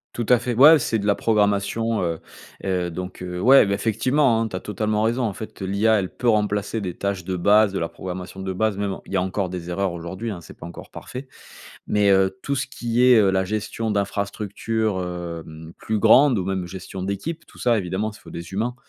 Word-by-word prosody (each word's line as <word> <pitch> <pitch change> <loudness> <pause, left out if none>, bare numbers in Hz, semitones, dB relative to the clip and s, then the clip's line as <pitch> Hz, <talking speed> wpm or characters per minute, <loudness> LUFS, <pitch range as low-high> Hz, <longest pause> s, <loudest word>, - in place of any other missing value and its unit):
Tout 120 - -2
à 125 - +6
fait, 125 - -2
ouais, 150 +5 +8
c'est 115 - 0
de 100 - -4
la 105 - +4
programmation, 105 +1 +1
heu, 85 -2 -2 0.4
heu, 90 -2 -1
donc, 90 +2 -7
heu, 90 -1 -5
ouais, 135 +2 +7
bah, 100 - 0
effectivement 115 +5 +2
hein, 115 - 0
tu 100 - -7
as 95 - -4
totalement 105 +1 -1
raison. 120 +3 +1
En 110 - -1
fait, 110 0 -9
heu, - - -2
l'IA 105 +3 +2
elle 95 - -3
peut 120 -1 +1
remplacer 105 0 0
des 90 -4 -4
tâches 100 -3 -3
de 95 0 -2
base, 100 +2 +4
de - - -1
la 85 - -2
programmation 95 +1 -7
de 95 0 -3
base, 110 +1 0
même 100 -1 -1
en - - -9
il - - -13
y 95 - +1
a - - +2
encore 95 0 -2
des 90 -1 -6
erreurs 95 +1 -1
aujourd'hui, 95 +6 -5
hein, 90 - -6
c'est 85 - -14
pas - - -9
encore 85 - -10
parfait. 130 +2 -8 0.6
Mais, 105 -1 +2
heu, 95 -1 +3
tout 140 - -2
ce 130 - -1
qui 120 +1 -1
est, 125 -2 +7
heu, 100 -2 +4
la 95 0 +1
gestion 110 +2 -3
d'infrastructures, 105 +1 -2
hem, 85 -2 -7
plus 110 -1 -2
grandes 125 +2 +6
ou 90 - -1
même 95 -1 -2
gestion 95 +1 -7
d'équipe 125 - -4
tout - - -18
ça 120 -2 +2
évidemment 95 +2 -2
s 105 - -12
il - - -21
faut - - -13
des 85 +2 -8
humains 115 +5 -1
100 Hz, 240 wpm, -23 LUFS, 95-110 Hz, 0.6 s, ouais